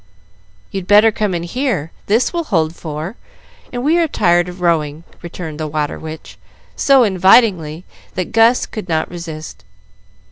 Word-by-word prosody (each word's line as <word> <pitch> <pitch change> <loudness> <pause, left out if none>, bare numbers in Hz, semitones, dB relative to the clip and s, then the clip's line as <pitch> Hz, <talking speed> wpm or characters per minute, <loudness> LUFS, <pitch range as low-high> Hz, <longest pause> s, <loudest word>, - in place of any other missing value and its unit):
"You'd 190 -2 -5
better 210 +2 +6
come 210 -3 -1
in 170 - -3
here, 190 - -2 0.2
this 225 - +2
will 340 -1 -2
hold 165 - 0
four, 160 +7 -6 0.5
and 245 -1 -4
we 325 +3 +3
are 335 - +2
tired 175 - +2
of 180 +1 -10
rowing," 160 -3 0 0.2
returned 165 -3 -7
the 155 - -2
"Water 150 -1 -3
Witch," 160 0 -9 0.4
so 270 -2 +4
invitingly 185 -5 +3 0.3
that 185 -1 -3
Gus 225 +2 +4
could 210 -5 -8
not 160 0 -1
resist. 155 - -8
180 Hz, 150 wpm, -17 LUFS, 160-220 Hz, 0.5 s, better